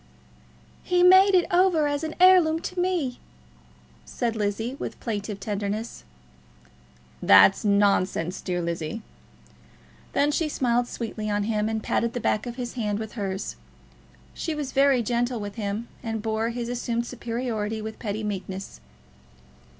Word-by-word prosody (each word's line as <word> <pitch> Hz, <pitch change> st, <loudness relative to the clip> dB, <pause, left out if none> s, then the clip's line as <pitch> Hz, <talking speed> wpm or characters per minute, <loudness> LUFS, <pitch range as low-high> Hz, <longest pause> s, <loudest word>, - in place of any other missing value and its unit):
"He 355 Hz, 0 st, +2 dB
made 375 Hz, +2 st, +7 dB
it 355 Hz, -, +4 dB
over 350 Hz, -4 st, +4 dB
as 290 Hz, +1 st, -1 dB
an 315 Hz, 0 st, -4 dB
heirloom 360 Hz, -3 st, +6 dB
to 365 Hz, +1 st, -5 dB
me," 350 Hz, -9 st, -1 dB, 0.8 s
said 235 Hz, -2 st, -3 dB
Lizzie, 220 Hz, +4 st, -2 dB
with -, -, -6 dB
plaintive 205 Hz, -3 st, -4 dB
tenderness. 205 Hz, -, -4 dB, 1.2 s
"That's 95 Hz, 0 st, +6 dB
nonsense, 200 Hz, -3 st, +1 dB
dear 175 Hz, -2 st, -2 dB
Lizzie." 170 Hz, +5 st, -4 dB, 1.1 s
Then 290 Hz, +1 st, +2 dB
she 305 Hz, +1 st, 0 dB
smiled 245 Hz, -3 st, +1 dB
sweetly 220 Hz, -3 st, -5 dB
on 205 Hz, 0 st, 0 dB
him, 215 Hz, 0 st, 0 dB
and 220 Hz, -1 st, -2 dB
patted 235 Hz, 0 st, 0 dB
the 245 Hz, -, -2 dB
back 215 Hz, +1 st, 0 dB
of 240 Hz, -, -5 dB
his 245 Hz, -2 st, -5 dB
hand 210 Hz, -4 st, -2 dB
with 220 Hz, 0 st, -5 dB
hers. 195 Hz, -, -4 dB, 0.8 s
She 320 Hz, -, -3 dB
was 290 Hz, -3 st, -4 dB
very 275 Hz, -3 st, +3 dB
gentle 240 Hz, +1 st, -1 dB
with 205 Hz, -1 st, -5 dB
him, 210 Hz, +1 st, -4 dB
and 225 Hz, -3 st, -4 dB
bore 220 Hz, +1 st, -1 dB
his 235 Hz, 0 st, -4 dB
assumed 235 Hz, -1 st, -2 dB
superiority 230 Hz, -3 st, -3 dB
with 220 Hz, 0 st, -7 dB
pretty 215 Hz, 0 st, -3 dB
meekness. 195 Hz, -, -5 dB
230 Hz, 140 wpm, -25 LUFS, 205-260 Hz, 1.2 s, made